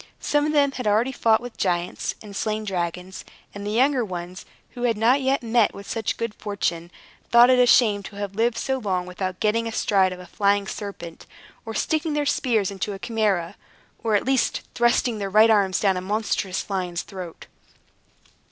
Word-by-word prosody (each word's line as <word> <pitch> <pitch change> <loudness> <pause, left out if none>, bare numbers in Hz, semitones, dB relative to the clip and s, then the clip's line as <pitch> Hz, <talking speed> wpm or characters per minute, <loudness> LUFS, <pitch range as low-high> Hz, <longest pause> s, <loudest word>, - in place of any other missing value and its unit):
Some 295 0 +1
of - - 0
them 285 -2 +3
had 250 -4 -4
already 220 +5 +2
fought 225 -3 +2
with 245 -1 -9
giants, 175 -2 -1
and 205 -2 -10
slain 215 +1 -2
dragons; 180 -1 -4 0.3
and 205 - -7
the - - -2
younger 255 +3 +2
ones, 180 -2 -7 0.3
who 245 - -9
had 235 -3 +1
not 245 +6 +3
yet 265 0 +1
met 230 -1 +2
with 200 - -10
such 225 -3 -2
good 230 -2 -3
fortune, 175 -6 -3 0.4
thought 240 +1 +7
it 255 - +4
a 250 - +5
shame 215 -5 +4
to 205 - -10
have 200 -1 -5
lived 225 +2 +1
so 265 +2 -1
long 185 -5 -1
without 185 0 -5
getting 230 +2 +1
astride 195 -4 +2
of 180 - -7
a 180 - -10
flying 200 +2 +1
serpent, 190 -5 -8 0.4
or 225 - -5
sticking 315 +4 0
their 295 0 0
spears 235 -8 +1
into 200 +1 -4
a - - -6
Chimaera, 195 -4 -1 0.5
or, 220 -2 +2
at 205 - +1
least, 265 -1 +1
thrusting 240 -1 +2
their 200 -1 -3
right 215 +3 +6
arms 195 -3 +2
down 195 -3 +2
a - - -3
monstrous 200 -1 -2
lion's 180 -3 -3
throat. 185 -4 -9
210 Hz, 190 wpm, -23 LUFS, 190-240 Hz, 0.5 s, thought